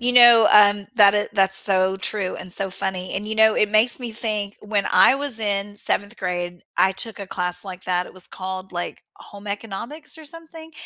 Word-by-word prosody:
You 245 +1 -1
know, 240 -2 +7
um, 205 -1 +5
that 205 -1 +6
i 205 - 0
that's 195 -1 +3
so 190 -1 +2
true 190 -1 -3
and 185 -1 -4
so 195 -1 +3
funny, 185 -1 -5
and, 205 +2 -4
you 220 - -4
know, 220 0 +4
it 210 - 0
makes 220 +4 +4
me 240 -2 -6
think 210 -2 -4
when 205 -2 -2
I - - +5
was 275 -5 0
in 205 -1 -3
7th 205 +2 -2
grade, 175 -1 -5
I 190 0 +3
took 220 +2 -4
a 195 - -7
class 180 0 -2
like 185 -1 -10
that, 180 0 -2
it - - -14
was 185 -1 -1
called, 185 0 -8
like, 175 0 -6
Home 205 0 -14
Economics 230 +10 -7
or 315 - -12
something. 325 0 -11
205 Hz, 210 wpm, -21 LUFS, 190-225 Hz, -, know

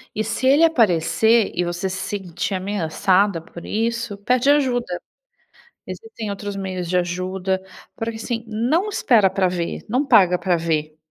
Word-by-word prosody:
E 215 - 0
se 225 +4 -3
ele 280 +5 +5
aparecer 225 - +3
e 175 - +1
você 175 +2 -3
se 185 - -4
sentir 190 -2 -4
ameaçada 190 0 +1
por 170 +1 -12
isso, 230 -1 -2
pede 250 +5 +1
ajuda. 245 -10 +1 0.9
Existem 430 - -7
outros 200 0 -5
meios 185 -2 -4
de 180 - 0
ajuda, 185 +2 -1 0.3
porque, 225 -1 -4
assim, 230 0 -4
não 245 - 0
espera 235 - +3
para 190 0 0
ver, 175 -2 -4
não 255 +6 0
paga 185 -8 +5
pra 180 -2 +1
ver. 155 -2 -2
200 Hz, 150 wpm, -21 LUFS, 180-230 Hz, 0.9 s, ele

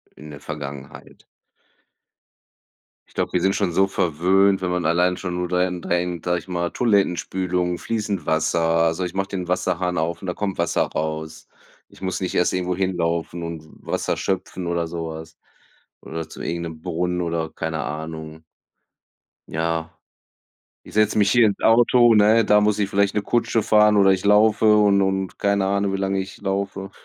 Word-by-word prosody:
in 75 0 -11
der 70 - -10
Vergangenheit. 70 -3 -9 1.8
Ich - - -24
glaube, - - -2
wir 90 - +1
sind 95 +2 +2
schon 100 -4 0
so 95 +3 +3
verwöhnt, 95 +3 +2
wenn 90 - -1
man 90 -1 -1
allein 90 +2 +2
schon 90 -1 -5
nur 90 0 -2
dahin 90 0 -1
denkt, 85 -1 -2
sage 90 0 +1
ich 85 - -16
mal, 85 -1 -2
Toilettenspülung, 90 -4 0
fließend 105 -7 -3
Wasser. 80 +2 +1
Also, 80 +1 +1
ich 90 - -6
mache 95 0 -2
den 90 -3 -4
Wasserhahn 90 0 -1
auf 80 +2 -2
und 95 - -7
da 90 - -1
kommt 100 -1 -3
Wasser 85 0 +1
raus. 80 0 -5 0.4
Ich - - -20
muss 95 -1 -2
nicht 95 - -3
erst 90 - +2
irgendwo 90 0 -1
hinlaufen 85 -2 -2
und 85 -2 -6 0.2
Wasser - - -2
schöpfen 95 -2 -3
oder 85 -1 -1
sowas 80 -1 -7 0.6
oder 80 0 -6
zu - - -11
irgend 85 0 -3
'nem 80 -1 -8
Brunnen, 90 +2 -2
oder, 85 -2 -2
keine 80 -1 -4
Ahnung. 80 +2 -7 1.1
Ja. 80 0 -2 0.9
Ich - - -14
setze 105 0 +2
mich 105 -1 +3
hier 120 -1 +5
ins 100 - -1
Auto, 120 +1 +5
ne? 110 +2 +5
Da 105 0 +4
muss 105 0 +1
ich 100 -1 0
vielleicht 100 0 +1
'ne 105 - 0
Kutsche 115 +1 0
fahren 105 0 +4
oder 100 -1 +5
ich 95 0 +1
laufe 105 +1 +5
und 100 -2 +4
und 95 -1 -1
keine 100 -1 +1
Ahnung, 100 0 0
wie - - 0
lange 95 0 -1
ich 95 0 -6
laufe. 95 0 -3
90 Hz, 175 wpm, -22 LUFS, 85-100 Hz, 1.8 s, hier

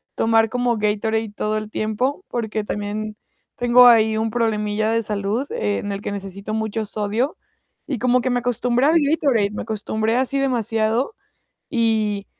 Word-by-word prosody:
tomar 225 -1 +3
como 245 -1 0
Gatorade 215 +1 0
todo 215 0 -1
el 215 0 -5
tiempo, 245 - -2
porque 220 -2 -3
también 210 +1 -4 0.4
tengo 245 +1 +6
ahí 220 -2 +5
un 225 +1 0
problemilla 215 -2 0
de 230 0 +1
salud 210 +6 -2
en 105 - -2
el 200 0 -4
que - - -4
necesito 200 +1 -6
mucho 220 0 -2
sodio 215 +7 -2 0.5
y 265 -7 -3
como 250 0 +3
que 255 - -1
me 245 0 +1
acostumbré 245 +1 0
al 315 - +4
Gatorade, 245 -10 +2
me - - -5
acostumbré 220 +1 -1
así 265 +1 0
demasiado 230 - 0 0.6
y 220 -4 0
220 Hz, 155 wpm, -21 LUFS, 210-245 Hz, 0.6 s, tengo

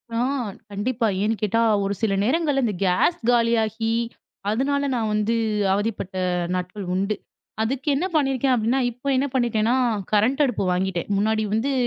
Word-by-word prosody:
ஆ - - 0 0.5
கண்டிப்பா. 225 +3 -1 0.2
ஏன்னு 220 +1 +1
கேட்டா 225 +3 +2 0.2
ஒரு 200 +1 -1
சில 220 -3 +1
நேரங்கள்ல 285 +1 +1
இந்த 210 -4 -1
கேஸ் 185 - +2
காலியாகி 225 -1 +1 0.6
அதுனால 280 +5 0
நான் 220 -2 -1
வந்து 215 +2 +1 0.4
அவதிப்பட்ட 200 -2 -2 0.4
நாட்கள் 180 +2 -4
உண்டு. 195 +3 0 0.5
அதுக்கு 260 +5 -2
என்ன 335 +7 0
பண்ணியிருக்கேன் 270 -3 +2
அப்டின்னா, 240 +3 +1
இப்ப 245 +4 -10
என்ன 260 +2 +2
பண்ணிட்டேன்னா 235 -2 +1 0.4
கரண்ட் 220 +7 +2
அடுப்பு 245 -6 -1
வாங்கிட்டேன். 180 -1 -1
முன்னாடி 220 +1 +1
வந்து 235 +6 +1
225 Hz, 140 wpm, -23 LUFS, 210-260 Hz, 0.6 s, கேட்டா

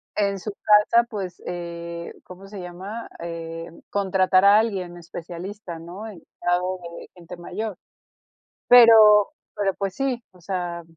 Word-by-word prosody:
en 200 -1 0
su 210 - -5
casa, 215 +3 +5
pues, 190 -4 -6
eh, 170 -1 -6
¿cómo 185 +2 -12
se 200 0 -9
llama?, 185 +6 -7
eh, 165 -1 -6 0.2
contratar 190 -1 +2
a 205 +1 +7
alguien 190 -6 -2
especialista, 175 +2 -8
¿no?, 175 +6 -9
especializado 180 -2 -3 0.2
en - - -11
gente 175 0 -11
mayor. 195 +3 -5 0.9
Pero 220 -4 +8 0.2
pero, 195 -2 0
pues, 195 -1 -3
sí, 260 0 -2
o 180 - -20
sea, 175 -1 -4
185 Hz, 130 wpm, -23 LUFS, 175-210 Hz, 0.9 s, Pero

